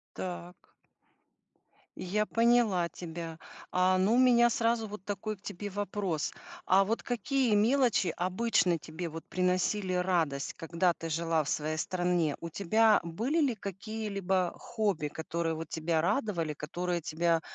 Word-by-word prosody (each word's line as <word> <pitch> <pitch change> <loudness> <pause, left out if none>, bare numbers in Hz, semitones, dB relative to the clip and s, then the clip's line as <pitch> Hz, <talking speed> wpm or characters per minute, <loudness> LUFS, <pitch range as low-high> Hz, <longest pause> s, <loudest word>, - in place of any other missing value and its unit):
Так. 180 -1 -7 1.2
Я 210 +4 -1
поняла 230 -6 +3
тебя. 165 -2 -7 0.3
А, 185 +1 +3
ну 190 +4 +3
у - - +3
меня 240 -2 +6
сразу 230 -1 +1
вот 205 -2 -8
такой 210 +1 -3
к - - -30
тебе 205 +1 -6
вопрос. 195 -5 -2 0.3
А 195 +1 +5
вот 225 +3 -1
какие 245 0 +1
мелочи 230 - +3
обычно 185 -1 +1
тебе 160 +2 -6
вот 160 +1 -7
приносили 185 +1 0
радость, 170 -6 0
когда 170 +2 0
ты 165 0 -6
жила 165 0 +1
в 145 - -5
своей 155 +1 -1
стране? 175 -3 0
У 170 - -5
тебя 215 +5 +3
были 230 - 0
ли 265 -5 +2
какие-либо 195 -3 -2
хобби, 205 -10 -1
которые 165 +2 -3
вот 165 +1 -6
тебя 160 0 0
радовали, 185 - 0
которые 175 +4 -3
тебя, 165 +1 +1
185 Hz, 140 wpm, -30 LUFS, 165-215 Hz, 1.2 s, меня